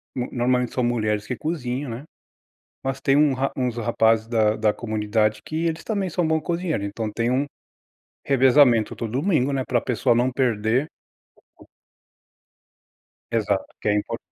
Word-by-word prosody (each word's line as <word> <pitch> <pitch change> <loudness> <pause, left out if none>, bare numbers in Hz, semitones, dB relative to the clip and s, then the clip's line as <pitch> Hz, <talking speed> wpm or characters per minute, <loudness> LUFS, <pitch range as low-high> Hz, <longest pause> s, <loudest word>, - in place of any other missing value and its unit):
no 125 -1 -3
normalmente 125 0 0
são 125 - 0
mulheres 110 -3 0
que 125 - -2
cozinham, 140 -4 -3
né? 120 +5 -6 0.8
Mas 135 -1 -2
tem 135 +1 +3
um 150 -1 +4
ra 135 +1 -1
uns 125 -3 -1
rapazes 115 -1 +2
da 110 -2 +2
da 110 -1 +2
comunidade 110 -1 -1
que 160 +2 -2
eles 165 0 -2
também 200 -5 -2
são 175 +1 0
bom 160 0 +1
cozinheiro. 170 - -2
Então 105 +2 -4
tem 115 +3 -1
um 135 +3 +1 0.8
revezamento 130 -4 +4
todo 115 -2 -5
domingo, 140 -1 +1
né? 130 -1 0
Pra 120 - +2
pessoa 120 0 +1
não 125 +2 +2
perder 120 +2 +1 2.5
Exato 100 -4 -1
que - - -5
é - - +3
impor 105 - -2
125 Hz, 155 wpm, -23 LUFS, 110-140 Hz, 2.5 s, um